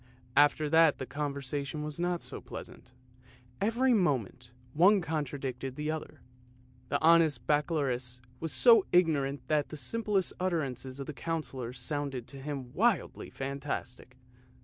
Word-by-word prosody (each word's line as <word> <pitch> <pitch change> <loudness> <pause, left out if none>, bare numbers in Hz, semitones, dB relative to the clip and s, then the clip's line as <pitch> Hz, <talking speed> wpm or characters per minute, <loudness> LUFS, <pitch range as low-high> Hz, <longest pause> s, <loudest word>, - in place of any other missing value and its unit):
After 145 +1 +4
that 160 0 +5
the 130 - -5
conversation 140 +1 -3
was 150 +1 -6
not 175 0 -1
so - - -6
pleasant, - - -10 0.7
every 240 +5 +3
moment 125 - 0 0.2
one 190 +6 +6
contradicted 135 -5 -4
the 150 +2 -2
other. 160 -1 -7 0.7
The - - +1
honest 165 -2 +4
Baccalaureus 135 -5 0 0.2
was 165 -1 -3
so 230 -5 +6
ignorant 140 -7 +2
that 150 -2 +1
the 155 - -7
simplest 210 +2 0
utterances 140 -7 -2
of 140 - -4
the 150 - -6
Councillor 135 -6 -4
sounded 135 0 -3
to 135 -1 -9
him 135 -3 -6
wildly 225 -1 0
fantastic. 135 -2 -5
145 Hz, 130 wpm, -30 LUFS, 135-165 Hz, 0.7 s, one